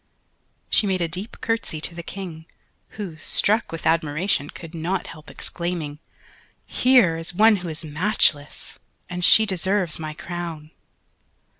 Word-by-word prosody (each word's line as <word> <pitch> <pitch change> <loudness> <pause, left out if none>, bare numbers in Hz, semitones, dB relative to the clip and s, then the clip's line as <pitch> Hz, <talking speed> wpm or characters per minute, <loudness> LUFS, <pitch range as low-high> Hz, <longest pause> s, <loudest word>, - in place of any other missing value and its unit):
She 210 - +3
made 185 -2 0
a 170 - +1
deep 185 +7 -5
curtsey 225 -8 -1
to 170 - -1
the 170 - -6
King 170 -3 -8 0.5
who, 190 -7 -5
struck 210 +7 +3
with 165 -1 -6
admiration, 160 -1 +1
could 165 -1 -10
not 170 +3 -2
help 155 -1 -11
exclaiming, 170 -4 -3 0.7
"Here 245 -10 +4
is 165 +1 -5
one 215 +2 +6
who 180 -2 -6
is 160 +1 -5
matchless, 150 -2 0 0.3
and 180 0 -3
she 220 +4 +7
deserves 190 -3 0
my 155 -1 -5
crown." 170 -3 -6
170 Hz, 140 wpm, -23 LUFS, 160-195 Hz, 0.7 s, she